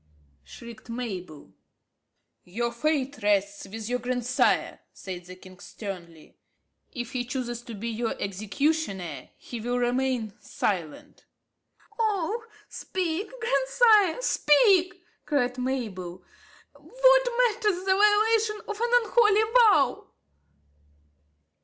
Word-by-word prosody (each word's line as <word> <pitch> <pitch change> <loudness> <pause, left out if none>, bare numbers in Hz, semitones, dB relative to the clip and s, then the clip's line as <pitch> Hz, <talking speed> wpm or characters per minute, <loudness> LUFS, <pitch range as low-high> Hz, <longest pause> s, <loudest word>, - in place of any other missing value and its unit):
shrieked 235 - -12
Mabel. 185 - -6 0.9
"Your 235 +6 -3
fate 280 +2 -1
rests 200 -1 0
with 220 +2 -7
your 250 +1 -1
grandsire," 245 0 0
said 180 -2 -8
the 185 +1 -10
king 185 0 -15
sternly. 175 -7 -9 0.5
"If 245 -3 -6
he 250 -1 -2
chooses 245 -1 -4
to 240 -2 -9
be 225 +3 -5
your 230 +1 -2
executioner 200 - -2
he 235 -2 -8
will 245 +2 -1
remain 245 -3 -1
silent." 170 -7 -4 0.7
"Oh, 435 0 -1 0.2
speak, 370 +1 -3
grandsire, 410 - +3
speak!" 370 0 +3 0.2
cried 255 -4 0
Mabel. 215 -9 -4 0.5
"What - - +3 0.2
matters 420 -5 0
the 380 - +4
violation 425 +2 +3
of 425 +1 -5
an 475 - +1
unholy 435 -2 +4
vow?" 415 - +4
250 Hz, 105 wpm, -26 LUFS, -, 0.9 s, the